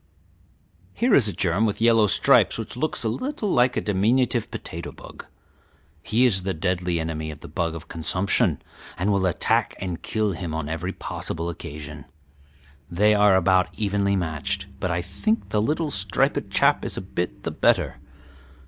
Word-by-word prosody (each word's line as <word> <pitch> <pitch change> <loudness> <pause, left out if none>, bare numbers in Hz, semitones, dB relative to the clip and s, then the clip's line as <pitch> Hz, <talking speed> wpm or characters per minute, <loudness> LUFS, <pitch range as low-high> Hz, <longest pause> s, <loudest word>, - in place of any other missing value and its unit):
"Here 240 -1 +1
is 125 - +5
a - - -1
germ 95 +4 +1
with 105 - -3
yellow 115 -2 +4
stripes 100 - +4
which - - -5
looks 150 +1 -2
a - - 0
little 245 - -3
like 125 -6 +3
a - - +1
diminutive 115 +4 +1
potato - - -6
bug. - - -12 0.7
He 115 +9 +2
is 100 -6 +4
the 95 0 -3
deadly 90 0 -1
enemy 80 -1 -3
of 75 -1 -9
the - - -9
bug 85 -1 -2
of 80 0 -9
consumption, 90 - +1 0.3
and 95 +4 0
will 100 -2 +2
attack 90 - +1
and 90 -3 -4
kill 110 -2 -1
him 85 -3 -5
on 80 -2 -3
every 80 +4 -3
possible 85 -2 -5
occasion. 75 -2 -9 0.8
They 105 +5 +3
are 105 -2 +5
about 95 0 +3
evenly 100 -1 0
matched, 80 -6 -2
but 90 - -2
I 85 0 -1
think 220 - -2
the 105 - +1
little 150 +6 -1
striped 95 -3 0
chap - - +3
is - - -5
a - - -2
bit 90 -9 -4
the - - -3
better. - - +1
95 Hz, 170 wpm, -24 LUFS, 85-110 Hz, 0.8 s, is